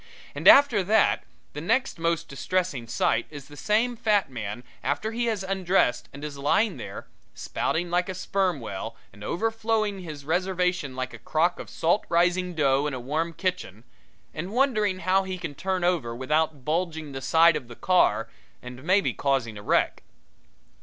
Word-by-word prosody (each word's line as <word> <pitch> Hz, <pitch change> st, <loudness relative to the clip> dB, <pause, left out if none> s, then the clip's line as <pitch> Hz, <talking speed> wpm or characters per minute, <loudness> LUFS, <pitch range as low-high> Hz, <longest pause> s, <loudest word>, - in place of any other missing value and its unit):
And -, -, -2 dB
after 265 Hz, -8 st, +7 dB
that, 215 Hz, +3 st, +3 dB, 0.3 s
the 150 Hz, -, -5 dB
next 230 Hz, -, 0 dB
most 165 Hz, 0 st, 0 dB
distressing 155 Hz, -3 st, -2 dB
sight 115 Hz, 0 st, +1 dB
is 145 Hz, -3 st, -10 dB
the 145 Hz, -, -13 dB
same 225 Hz, +9 st, +1 dB
fat 210 Hz, -, +1 dB
man 110 Hz, -1 st, -5 dB, 0.2 s
after 145 Hz, +11 st, -1 dB
he 235 Hz, +1 st, -1 dB
has 220 Hz, -4 st, -1 dB
undressed 185 Hz, -10 st, +1 dB
and 140 Hz, +1 st, -10 dB
is 145 Hz, -2 st, -6 dB
lying 195 Hz, +8 st, +2 dB
there, -, -, -7 dB, 0.3 s
spouting 175 Hz, +1 st, -2 dB
like 180 Hz, +1 st, +1 dB
a 190 Hz, -, -4 dB
sperm 185 Hz, -3 st, 0 dB
whale 110 Hz, 0 st, -6 dB, 0.2 s
and 105 Hz, +1 st, -13 dB
overflowing 220 Hz, -, -1 dB
his 155 Hz, -6 st, -8 dB
reservation 180 Hz, -3 st, 0 dB
like 130 Hz, 0 st, -4 dB
a -, -, -9 dB
crock 170 Hz, +3 st, 0 dB
of -, -, -8 dB
salt 170 Hz, +6 st, +1 dB
rising 180 Hz, +1 st, +2 dB
dough 140 Hz, -1 st, +2 dB
in 145 Hz, -, -3 dB
a -, -, -5 dB
warm 155 Hz, +7 st, -2 dB
kitchen, 180 Hz, -, -3 dB, 0.5 s
and 170 Hz, +5 st, -5 dB
wondering 215 Hz, -7 st, +1 dB
how 185 Hz, +2 st, +3 dB
he 190 Hz, -1 st, -5 dB
can 170 Hz, -5 st, -5 dB
turn 185 Hz, +4 st, -2 dB
over 160 Hz, -10 st, 0 dB
without 150 Hz, +2 st, 0 dB
bulging 160 Hz, -2 st, -2 dB
the 135 Hz, -1 st, -6 dB
side 165 Hz, +3 st, +5 dB
of 125 Hz, -, -4 dB
the 120 Hz, -, -10 dB
car 115 Hz, -, +2 dB, 0.3 s
and 125 Hz, +1 st, -10 dB
maybe 190 Hz, +4 st, +2 dB
causing 135 Hz, -6 st, 0 dB
a 105 Hz, -, -8 dB
wreck. -, -, +1 dB
170 Hz, 175 wpm, -26 LUFS, 140-190 Hz, 0.5 s, after